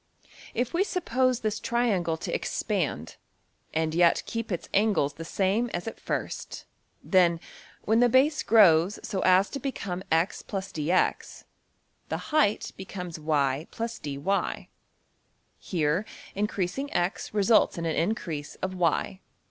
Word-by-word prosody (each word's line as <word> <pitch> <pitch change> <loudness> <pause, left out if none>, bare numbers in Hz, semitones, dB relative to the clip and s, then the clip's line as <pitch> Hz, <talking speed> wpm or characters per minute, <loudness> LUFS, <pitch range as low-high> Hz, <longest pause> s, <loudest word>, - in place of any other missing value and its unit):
If 245 +5 -1
we 350 +3 +3
suppose 255 - 0
this 215 0 -1
triangle 200 -9 0
to - - -5
expand - - -2 0.5
and 160 0 0
yet 170 0 +4
keep 230 -2 -4
its 175 - -3
angles 200 -9 +2
the 165 - -8
same 200 +7 0
as 175 +5 -4
at 225 - -6
first, - - -4 0.4
then, 175 -3 +3 0.4
when 220 +2 +3
the 245 0 +5
base 275 +5 +3
grows 195 -3 +5
so 195 - -3
as 185 +2 +4
to 280 - -4
become 200 -9 -4
$x 165 +4 +1
+ - - -35
dx$, 185 -3 -1 0.7
the - - -1 0.2
height 295 -10 +2
becomes 180 -3 -7
$y 150 -1 0 0.2
+ 230 - -9
dy$. 150 +7 -2 0.9
Here, 165 +1 0 0.3
increasing~$x$ 200 0 -2
results 215 0 +3
in 170 - -3
an 160 - 0
increase 165 -5 -2
of~$y$. 185 0 -1
190 Hz, 130 wpm, -27 LUFS, 165-225 Hz, 0.9 s, the